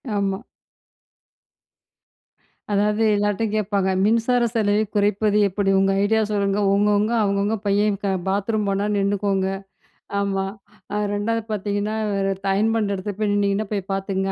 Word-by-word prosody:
ஆமா. 195 -1 0 2.3
அதாவது 210 +2 +2
எல்லார்ட்டயும் 205 +1 0
கேட்பாங்க 200 -2 0
மின்சார 230 +3 +2
செலவை 210 -1 +2
குறைப்பது 205 +1 +2
எப்படி? 195 +1 -1
உங்க 195 0 +3
ஐடியா 220 +2 +2
சொல்லுங்க, 200 0 0
உங்கவங்க 205 +2 +2
அவங்கவங்க 200 +2 0
பையன் 205 0 +2 0.3
பாத்ரூம் 205 +2 0
போனா 195 +1 0
நின்னுக்கோங்க. 195 -1 0 0.7
ஆமா. 195 -1 -1 0.7
2ஆவது 225 +2 -1
பார்த்தீங்கன்னா, 205 +1 -2 0.6
அயன் 220 +3 +2
பண்ற 210 -3 0
இடத்துல 195 +1 -5
போய் 210 -1 +1
நின்னிங்கன்னா 200 +1 0
போய் 195 -1 -3
பார்த்துக்கோங்க, 195 0 -2
205 Hz, 115 wpm, -22 LUFS, 195-210 Hz, 2.3 s, உங்க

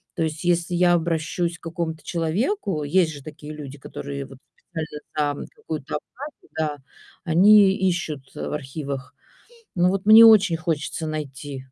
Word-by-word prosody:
То 165 - 0
есть, 155 +1 -3
если 175 0 +1
я 175 0 +4
обращусь 170 +1 -1
к - - -53
какому-то 165 -1 -4
человеку, 175 - -1
есть 165 +2 +2
же 140 - -9
такие 155 0 -9
люди, 145 -2 -9
которые, 140 0 -7
вот, 135 -1 -13 0.3
специально 150 -2 -3
за - - -16
какую-то 150 -3 -5
оплату, 280 - -9
да, 150 -2 -1 0.5
они 195 +4 +6
ищут 175 -7 -1
в - - -5
архивах. 140 -1 -5 0.6
Ну, 175 +1 +4
вот 195 +1 -2
мне 220 +1 +10
очень 210 -7 +7
хочется 160 0 -3
найти. 145 -2 -5
160 Hz, 150 wpm, -23 LUFS, 150-180 Hz, 0.6 s, мне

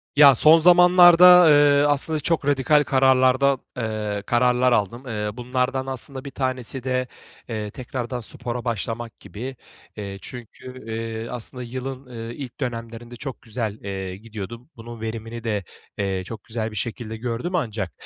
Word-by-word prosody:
Ya, 140 -2 +8
son 155 +7 +7
zamanlarda, 180 0 +7
eee, 145 -1 +5
aslında 145 +2 +1
çok 165 -2 -1
radikal 145 +1 +3
kararlar 130 -1 +3
da 140 -1 +3 0.2
eee, 105 -3 -3
kararlar 125 +2 +2
aldım. 115 +2 0
Eee, 105 -3 -3
bunlardan 125 +2 -2
aslında 135 +1 -6
bir 140 - -7
tanesi 130 -1 -3
de, 130 -1 -1 0.4
eee, 105 -2 -4
tekrardan 125 0 -5
spora 120 +1 -5
başlamak 115 0 -4
gibi. 115 +8 -8 0.4
Eee, 100 -2 -6
çünkü, 125 +1 -10
eee, 115 0 -5
aslında 125 +1 -4
yılın, 130 +2 -6
ııı, 115 -2 -8
ilk 130 0 -9
dönemlerinde 115 -2 -6
çok 135 +2 -7
güzel, 110 -2 -4
eee, 95 -2 -5
gidiyordum. 115 +4 -9
Bunun 115 0 -10
verimini 115 +1 -6
de, 105 -4 -2 0.3
eee, 95 -2 -2
çok 110 +1 -9
güzel 110 -1 -4
bir - - -10
şekilde 110 +1 -5
gördüm 120 +10 -3
ancak, 110 - -2
120 Hz, 150 wpm, -23 LUFS, 110-135 Hz, 0.4 s, Ya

